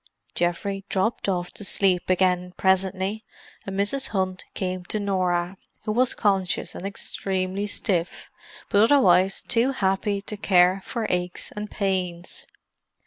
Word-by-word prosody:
Geoffrey 195 Hz, +3 st, -1 dB
dropped 200 Hz, +2 st, 0 dB
off 180 Hz, -2 st, -1 dB
to -, -, -8 dB
sleep 190 Hz, -3 st, +2 dB
again, 180 Hz, -1 st, +2 dB
presently, 190 Hz, +2 st, +1 dB, 0.4 s
and 195 Hz, 0 st, -3 dB
Mrs. 260 Hz, +7 st, 0 dB
Hunt 185 Hz, -2 st, -2 dB
came 185 Hz, -1 st, -3 dB
to 215 Hz, -, -3 dB
Norah, 185 Hz, -2 st, 0 dB, 0.3 s
who 215 Hz, -, -1 dB
was 245 Hz, +3 st, +2 dB
conscious, 195 Hz, -4 st, 0 dB
and 195 Hz, -, -5 dB
extremely 195 Hz, 0 st, -2 dB
stiff, 185 Hz, -4 st, -2 dB, 0.4 s
but 200 Hz, -, +4 dB
otherwise 195 Hz, -7 st, +4 dB
too 245 Hz, +3 st, +2 dB
happy 200 Hz, -2 st, 0 dB
to 205 Hz, +2 st, -6 dB
care 185 Hz, -1 st, +4 dB
for 230 Hz, -2 st, -3 dB
aches 180 Hz, 0 st, -2 dB
and 210 Hz, 0 st, -6 dB
pains. 185 Hz, -3 st, -2 dB
190 Hz, 135 wpm, -25 LUFS, 180-205 Hz, 0.4 s, but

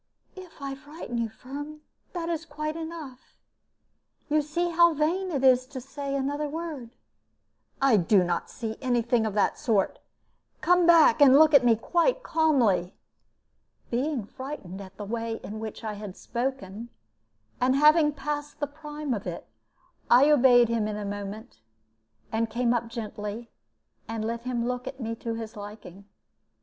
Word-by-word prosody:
"If 370 Hz, -4 st, -12 dB
I 275 Hz, -1 st, -4 dB
frighten 290 Hz, -3 st, -7 dB
you, 230 Hz, -1 st, -1 dB
Firm, 290 Hz, +7 st, -8 dB, 0.3 s
that 340 Hz, -2 st, -3 dB
is 330 Hz, -1 st, -2 dB
quite 305 Hz, -1 st, -5 dB
enough. 320 Hz, -6 st, -7 dB, 1.1 s
You 305 Hz, +1 st, +3 dB
see 340 Hz, +4 st, -1 dB
now 335 Hz, -, -7 dB
how 340 Hz, 0 st, +6 dB
vain 345 Hz, +6 st, 0 dB
it 280 Hz, -6 st, -2 dB
is 255 Hz, -1 st, +5 dB
to 265 Hz, -1 st, -7 dB
say 275 Hz, +2 st, -5 dB
another 290 Hz, +2 st, -1 dB
word." 305 Hz, -6 st, -5 dB, 0.9 s
"I 270 Hz, -5 st, +4 dB
do 190 Hz, +1 st, +4 dB
not 175 Hz, 0 st, -2 dB
see 220 Hz, -2 st, -5 dB
any 245 Hz, -3 st, +1 dB
thing 230 Hz, -1 st, +1 dB
of 210 Hz, -, -4 dB
the 205 Hz, -, +3 dB
sort. 210 Hz, -5 st, 0 dB, 0.6 s
Come 355 Hz, +2 st, +3 dB
back, 325 Hz, -7 st, +6 dB
and 275 Hz, -1 st, +8 dB
look 310 Hz, 0 st, +6 dB
at 280 Hz, -3 st, +7 dB
me 235 Hz, -2 st, +5 dB
quite 345 Hz, -, +1 dB
calmly." 250 Hz, -, +2 dB, 1.0 s
Being 255 Hz, -1 st, -1 dB
frightened 210 Hz, -7 st, -8 dB
at 190 Hz, 0 st, -12 dB
the 205 Hz, -, -6 dB
way 230 Hz, +1 st, -3 dB
in 215 Hz, +1 st, -6 dB
which 220 Hz, +1 st, -7 dB
I 215 Hz, -1 st, -3 dB
had 205 Hz, -2 st, -8 dB
spoken, 235 Hz, -3 st, -4 dB, 0.7 s
and 255 Hz, +1 st, +3 dB
having 300 Hz, +1 st, +5 dB
passed 295 Hz, +1 st, -5 dB
the 290 Hz, -, 0 dB
prime 295 Hz, -1 st, -5 dB
of 200 Hz, -4 st, -4 dB
it, 170 Hz, -, -6 dB, 0.6 s
I 270 Hz, +5 st, +6 dB
obeyed 245 Hz, -4 st, +6 dB
him 225 Hz, -2 st, 0 dB
in 210 Hz, -1 st, -3 dB
a 210 Hz, -, -4 dB
moment, 205 Hz, +3 st, -7 dB, 0.7 s
and 225 Hz, +1 st, 0 dB
came 235 Hz, +1 st, +1 dB
up 235 Hz, -1 st, -1 dB
gently 220 Hz, -1 st, -6 dB, 0.6 s
and 225 Hz, -1 st, -3 dB
let 230 Hz, +1 st, -3 dB
him 240 Hz, -2 st, -1 dB
look 250 Hz, 0 st, -3 dB
at 265 Hz, -, -7 dB
me 230 Hz, -2 st, -3 dB
to 230 Hz, 0 st, -4 dB
his 225 Hz, 0 st, -7 dB
liking. 205 Hz, -2 st, -10 dB
255 Hz, 165 wpm, -27 LUFS, 225-300 Hz, 1.1 s, and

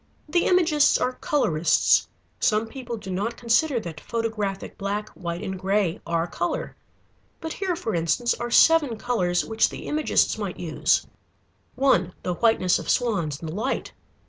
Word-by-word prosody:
The 345 Hz, +3 st, +1 dB
Imagists 330 Hz, -5 st, +4 dB
are 255 Hz, -, -1 dB
colorists. 170 Hz, -, +2 dB, 0.3 s
Some 215 Hz, 0 st, +2 dB
people 240 Hz, 0 st, -7 dB
do 190 Hz, -3 st, -8 dB
not 205 Hz, +6 st, -2 dB
consider 240 Hz, +3 st, +2 dB
that 160 Hz, -5 st, -8 dB
photographic 215 Hz, -4 st, -3 dB
black, 205 Hz, +2 st, -3 dB
white, 170 Hz, +1 st, -6 dB
and 190 Hz, -2 st, -4 dB
gray 190 Hz, -2 st, 0 dB
are 170 Hz, 0 st, 0 dB
color. 175 Hz, 0 st, -3 dB, 0.6 s
But 320 Hz, -1 st, -5 dB
here 380 Hz, -3 st, -2 dB
for 230 Hz, -10 st, -4 dB
instance 170 Hz, +9 st, +1 dB
are 240 Hz, 0 st, -4 dB
seven 295 Hz, -2 st, +5 dB
colors 185 Hz, -7 st, 0 dB
which 220 Hz, 0 st, +2 dB
the -, -, -8 dB
Imagists 305 Hz, 0 st, +1 dB
might -, -, -4 dB
use: -, -, +1 dB, 0.7 s
(1) 190 Hz, -10 st, +2 dB
The 180 Hz, -, -1 dB
whiteness 185 Hz, -2 st, +2 dB
of -, -, -7 dB
swans 190 Hz, -, 0 dB
in 165 Hz, -, -5 dB
the 155 Hz, -, -5 dB
light. 225 Hz, +8 st, -3 dB
220 Hz, 155 wpm, -24 LUFS, 180-250 Hz, 0.7 s, seven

